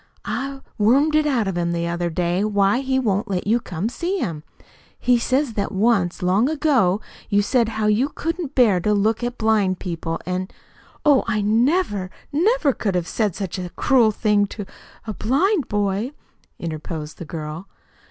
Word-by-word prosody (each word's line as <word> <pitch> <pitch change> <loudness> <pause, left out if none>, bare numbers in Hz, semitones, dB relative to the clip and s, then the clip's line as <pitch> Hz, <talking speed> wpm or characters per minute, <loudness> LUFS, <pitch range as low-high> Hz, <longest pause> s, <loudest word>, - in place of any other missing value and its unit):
I 275 0 -4 0.2
wormed 270 +9 +4
it 305 0 +3
out 240 -8 +1
of 190 - -2
him 170 0 0
the 170 0 -1
other 170 0 -1
day 175 +3 0
why 205 +2 +2
he 265 -1 0
won't 215 -4 0
let 185 -2 -2
you 225 +4 +3
come 180 -2 -4
to 240 - -6
see 360 +3 -2
him. 165 - -3 0.6
He 245 -1 +3
says 260 +1 0
that 200 -2 -2
once, 195 -3 +1
long 195 +9 +3
ago, 265 - +2 0.3
you 205 -1 +3
said 235 +1 +2
how 220 -1 -2
you 215 +7 +2
couldn't 325 -1 -4
bear 220 -8 +5
to 210 +4 +1
look 220 +3 +1
at 240 0 -3
blind 215 -4 +2
people, 165 -2 -4
an' 185 +1 -2 0.3
" - - -28
"Oh, 290 -3 +5
I 215 -2 0
never, 220 - +1 0.2
never 325 - +2
could 200 -5 -2
have 175 -2 -1
said 210 -3 -1
such 190 -2 -4
a 180 -1 -4
cruel 250 -5 +4
thing 210 -1 +2
to 205 0 -7
to - - -21 0.3
a 215 - -4
blind 285 - +1
boy," 205 +5 -1 0.4
interposed 155 -1 -6
the 170 - -6
girl. 155 +3 -6
210 Hz, 185 wpm, -22 LUFS, 185-260 Hz, 0.6 s, bear